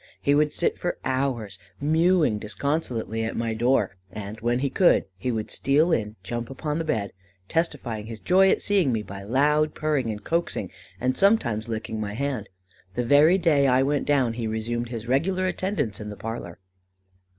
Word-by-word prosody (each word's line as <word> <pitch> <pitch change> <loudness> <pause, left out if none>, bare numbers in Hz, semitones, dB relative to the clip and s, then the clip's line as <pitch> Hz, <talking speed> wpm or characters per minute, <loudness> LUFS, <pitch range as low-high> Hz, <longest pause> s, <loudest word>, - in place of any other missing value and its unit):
He 140 - +2
would 150 +1 +3
sit 170 - 0
for 175 - -2
hours 130 -7 -1 0.2
mewing 160 - +3
disconsolately 115 -1 -2
at 110 - -3
my 115 -1 -1
door; 120 -3 +1
and 105 +2 -7
when 120 +1 +1
he 135 +2 0
could, 180 +5 +4
he 110 +7 -2
would 110 -2 -3
steal 150 +5 +2
in, 110 -8 0
jump 120 +5 -4
upon 150 +3 -3
the - - -1
bed, 110 -10 -2 0.3
testifying 120 -9 -2
his 115 -1 -7
joy 190 - +4
at - - +1
seeing 195 -9 +2
me 110 -2 -1
by 100 0 -8
loud 150 +8 +2
purring 150 -6 0
and 105 -1 -5
coaxing, 170 +7 -1 0.3
and 130 +1 0
sometimes 120 - +2
licking 110 0 -4
my 105 -1 -4
hand. 130 -5 -3 0.5
The 125 - -1
very 150 +8 +6
day 155 -6 +3
I 130 0 +4
went 145 +1 0
down, 135 -5 +2
he 115 -1 -3
resumed 115 +2 -2
his 115 -1 -6
regular 185 +9 +1
attendance 185 - -2
in 105 - -6
the 105 - -8
parlour." 115 -6 -6
125 Hz, 180 wpm, -25 LUFS, 110-150 Hz, 0.5 s, very